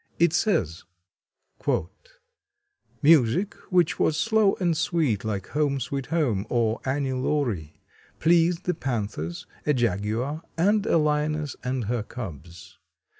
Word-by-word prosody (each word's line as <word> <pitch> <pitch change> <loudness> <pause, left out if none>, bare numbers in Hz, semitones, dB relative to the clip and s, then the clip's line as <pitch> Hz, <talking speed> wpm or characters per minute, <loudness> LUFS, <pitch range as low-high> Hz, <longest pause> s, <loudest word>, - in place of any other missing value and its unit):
It 170 -1 +3
says: 165 - 0 2.2
"Music 160 - +4 0.2
which 180 -4 +2
was 155 - +2
slow 220 +1 +3
and 175 -3 0
sweet, 155 - 0
like 100 -4 -3
'Home, 145 -2 0
Sweet 130 +1 -4
Home,' 120 -12 0
or 115 -2 +1
'Annie 135 0 -1
Laurie,' 125 - -2 0.3
pleased 170 +1 +3
the 180 - 0
panthers, 105 - -4 0.2
a 150 - +2
jaguar 120 - -1 0.2
and 205 +5 +2
a - - +4
lioness 150 -1 0
and 125 0 -1
her 115 +2 -1
cubs. 85 - -9
140 Hz, 120 wpm, -25 LUFS, 110-165 Hz, 2.2 s, Music